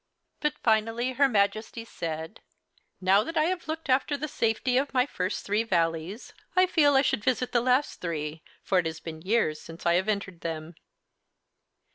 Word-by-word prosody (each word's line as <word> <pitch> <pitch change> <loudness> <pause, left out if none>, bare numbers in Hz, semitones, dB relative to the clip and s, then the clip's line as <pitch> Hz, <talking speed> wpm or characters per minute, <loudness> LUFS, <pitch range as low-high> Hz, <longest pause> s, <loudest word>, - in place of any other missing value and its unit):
But 300 0 0
finally 225 +2 +2
her 270 +2 +3
Majesty 215 +1 0
said, 160 -1 -6 0.6
"Now 195 +2 +4
that 330 +7 -5
I 310 - +4
have 350 +1 -2
looked 320 0 -4
after 275 +2 +2
the 305 +2 -3
safety 235 -2 0
of 270 +1 0
my 250 0 +4
first 185 -9 -3
three 205 +2 +1
Valleys, 170 0 -1 0.2
I 370 0 +6
feel 300 -6 +4
I 270 - +5
should 210 - 0
visit 250 0 0
the 240 - +3
last 255 +4 +1
three, 155 -2 -4 0.2
for 190 - +2
it 170 - 0
has 160 0 -5
been 160 -1 -8
years 185 -6 +1
since 165 +1 -11
I 170 - +4
have 185 +4 +1
entered 200 -4 -2
them." 160 0 -5
220 Hz, 180 wpm, -27 LUFS, 170-260 Hz, 0.6 s, I